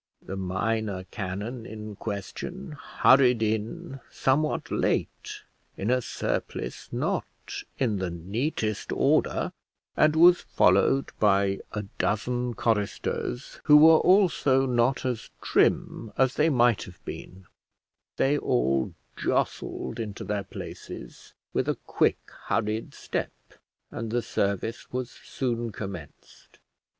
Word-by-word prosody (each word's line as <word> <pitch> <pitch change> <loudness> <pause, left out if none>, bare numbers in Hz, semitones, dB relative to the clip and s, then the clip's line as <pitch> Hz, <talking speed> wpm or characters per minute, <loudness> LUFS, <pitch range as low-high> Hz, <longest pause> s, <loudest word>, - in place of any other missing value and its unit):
The 95 - -5
minor 95 +1 -1
canon 105 +4 -4
in 105 -1 -7
question 115 - -5
hurried 130 -4 +4
in, 115 +8 -2
somewhat 150 +3 0
late, - - -1 0.3
in 105 +5 0
a 125 0 +3
surplice 60 - -4
not - - -1 0.5
in 115 -6 +1
the 95 -1 -2
neatest 105 - -2
order, - - +2 0.4
and 155 0 +4
was 175 +2 +7
followed 100 +9 +3
by 100 -1 +3
a 105 -1 -2 0.2
dozen 120 +3 0
choristers, 115 +4 -2
who 150 -1 +8
were 160 +1 +8
also 165 -9 +4
not 125 +1 +1
as 125 -3 -2
trim 110 - +1
as 130 0 +3
they 155 +2 +3
might 120 -6 +4
have 90 -2 -15
been: 95 0 -8 0.7
they 145 +2 +3
all 65 +2 +1 0.2
jostled 120 - -2
into 105 -3 -5
their 100 -1 -2
places - - -9 0.2
with - - 0
a - - +1
quick - - +2 0.3
hurried 110 0 -1
step, - - -3 0.6
and 115 - -4
the 120 +1 0
service 100 +3 -2
was 125 -1 -3
soon 120 -3 -3
commenced. 95 -7 -9
115 Hz, 115 wpm, -27 LUFS, 100-130 Hz, 0.7 s, who